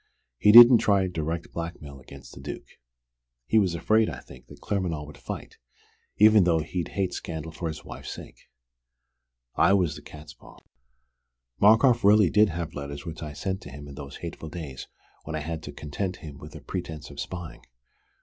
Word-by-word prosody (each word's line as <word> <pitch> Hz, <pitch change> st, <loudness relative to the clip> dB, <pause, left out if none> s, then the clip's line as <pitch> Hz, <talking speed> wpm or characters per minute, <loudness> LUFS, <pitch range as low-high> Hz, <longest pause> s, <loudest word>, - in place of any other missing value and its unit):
He 105 Hz, -, +6 dB
didn't 120 Hz, +1 st, +10 dB
try 100 Hz, -2 st, +2 dB
direct 85 Hz, -1 st, -4 dB
blackmail 80 Hz, -5 st, -7 dB
against 70 Hz, +1 st, -13 dB
the -, -, -11 dB
Duke. -, -, -9 dB, 0.7 s
He 110 Hz, -, +3 dB
was 95 Hz, -5 st, +1 dB
afraid, 110 Hz, +6 st, +2 dB
I -, -, -6 dB
think, -, -, -15 dB
that -, -, -14 dB
Claremanagh 85 Hz, -7 st, -2 dB
would 75 Hz, -1 st, -12 dB
fight -, -, -8 dB, 0.6 s
even 105 Hz, -1 st, +7 dB
though 85 Hz, -2 st, +3 dB
he'd 85 Hz, +2 st, -4 dB
hate 95 Hz, -2 st, 0 dB
scandal 80 Hz, -1 st, -6 dB
for 85 Hz, +1 st, -5 dB
his 80 Hz, -2 st, -7 dB
wife's -, -, -8 dB
sake. -, -, -12 dB, 1.0 s
I 95 Hz, -, +4 dB
was 90 Hz, -6 st, +1 dB
the 75 Hz, -, -10 dB
catspaw. 75 Hz, +1 st, -13 dB, 1.0 s
Markoff 115 Hz, +3 st, +5 dB
really 105 Hz, -3 st, +5 dB
did 105 Hz, 0 st, +5 dB
have 85 Hz, -1 st, -5 dB
letters 70 Hz, 0 st, -7 dB
which 80 Hz, 0 st, -7 dB
I 80 Hz, -, -5 dB
had 75 Hz, -1 st, -9 dB
sent 95 Hz, +2 st, -3 dB
him 75 Hz, +2 st, -10 dB
in 70 Hz, -, -10 dB
those 70 Hz, 0 st, -9 dB
hateful 80 Hz, -2 st, -7 dB
days 75 Hz, -6 st, -8 dB, 0.4 s
when 80 Hz, -, -5 dB
I 80 Hz, -, -3 dB
had 80 Hz, +1 st, -5 dB
to -, -, -7 dB
content 90 Hz, +5 st, -4 dB
him 75 Hz, -5 st, -11 dB
with -, -, -11 dB
a -, -, -9 dB
pretense 80 Hz, -5 st, -6 dB
of 70 Hz, -, -11 dB
spying. 85 Hz, +4 st, -7 dB
85 Hz, 180 wpm, -26 LUFS, 75-95 Hz, 1.0 s, didn't